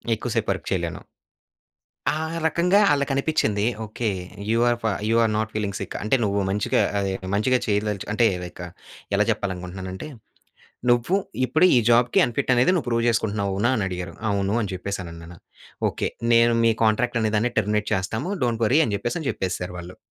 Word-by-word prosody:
ఎక్కువ - - -5
సేపు - - 0
వర్క్ - - -4
చేయలేను. - - -2 1.1
ఆ! - - -2 0.3
రకంగా 180 +5 +3
ఆళ్ళకనిపించింది 135 -7 +1 0.2
ఓకే. 110 +1 -2 0.4
యూ 115 - +2
ఆర్ 120 - +1
ఫ - - -3 0.2
you 115 - +3
are 110 - +2
not 110 0 -2
feeling 100 -2 -2
sick - - -6
అంటే 110 - +2
నువ్వు 100 -1 0
మంచిగా 100 +1 +1 0.2
ఆహ్, 100 -1 -1 0.2
మంచిగా 125 +4 +2
చేయదలచు 105 -1 -1
అంటే 115 +2 +3 0.2
లైక్ 90 0 -8 0.5
ఎలా - - +4
చెప్పాలనుకుంటున్నానంటే 95 +3 -5 0.8
"నువ్వు 120 +9 +2 0.3
ఇప్పుడు 155 +8 +2
ఈ - - +7
జాబ్‌కి 120 +1 +4
అన్‌ఫిట్ 130 +3 -1
అనేది 125 +8 +4
నువ్వు 170 - -1
ప్రూవ్ 115 0 +1
చేసుకుంటున్నావు. 105 -4 0
అవునా?" 110 +6 +1
అని 105 - 0
అడిగారు 90 -2 -5 0.2
అవును. 100 0 0
అని 105 - -2
చెప్పేసి 100 +2 -4
అనన్నాను. 85 0 -10 0.5
ఓకే. - - -2 0.3
నేను 115 0 +5
"మీ 115 - +5
కాంట్రాక్ట్ 120 +2 +2
అనే 110 -1 0
దాన్ని 120 +3 +1
టెర్మినేట్ 105 0 0
చేస్తాము 105 - -2
డోంట్ 115 -1 -1
వర్రీ." 140 +8 +4
అని 105 - -2
చెప్పేసి 140 +9 -3
చెప్పేసారు 90 -1 -3
వాళ్ళు. 90 +1 -9
110 Hz, 165 wpm, -24 LUFS, 100-120 Hz, 1.1 s, ఈ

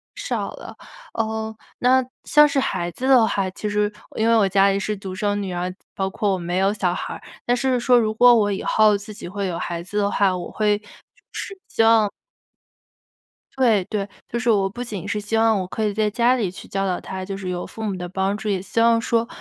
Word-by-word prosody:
少 - - -3
了。 - - -10 0.4
呃， 220 0 -2 0.2
那 260 +1 +4 0.2
像 300 0 +6
是 280 -1 0
孩 175 -9 -1
子 255 +8 -4
的 255 -4 +6
话， 195 -3 -1
其 210 +3 -4
实 210 0 +1 0.3
因 220 - +2
为 230 - +5
我 210 -3 +4
家 195 +1 +4
里 195 0 +1
是 210 +2 -2
独 190 -1 -7
生 205 +1 -1
女 190 -2 -4
儿， 180 +1 -3 0.2
包 190 0 -1
括 200 +1 -1
我 - - 0
没 175 0 -3
有 195 +2 +2
小 185 -4 0
孩 - - -4
儿。 - - -9 0.2
但 245 - +2
是 255 0 +1
说 245 +1 +4
如 215 -2 0
果 245 +2 +7
我 210 -3 +3
以 195 - -3
后 215 -1 +4
自 205 +2 -9
己 205 - -8
会 195 +2 -3
有 175 -2 -3
孩 170 -1 -3
子 205 +4 -6
的 200 0 +1
话， 195 -2 +2
我 175 -1 -5
会 210 -1 +1
就 210 - -24 0.5
是 395 - -5
希 225 - +1
望 225 -2 +5 1.5
对 230 -7 +3
对， 200 -1 -3 0.2
就 235 - -2
是 240 0 0
我 200 -3 +3
不 240 +5 -6
仅 210 -7 -6
是 210 - -1
希 210 +2 -3
望 225 -2 +3
我 185 - -3
可 220 - -3
以 210 -1 0
在 215 0 +1
家 235 +4 +3
里 220 -7 -1
去 185 - -11
教 195 0 -2
导 185 -2 -1
他， 190 0 -6
就 195 +1 -5
是 190 -1 -5
有 175 -1 -3
父 225 - -10
母 205 -3 -2
的 180 -1 -5
帮 190 +2 -1
助， 215 +1 -6
也 195 -3 0
希 195 - -3
望 230 0 +5
说， 230 0 +1
210 Hz, 260 characters per minute, -22 LUFS, 195-225 Hz, 1.5 s, 果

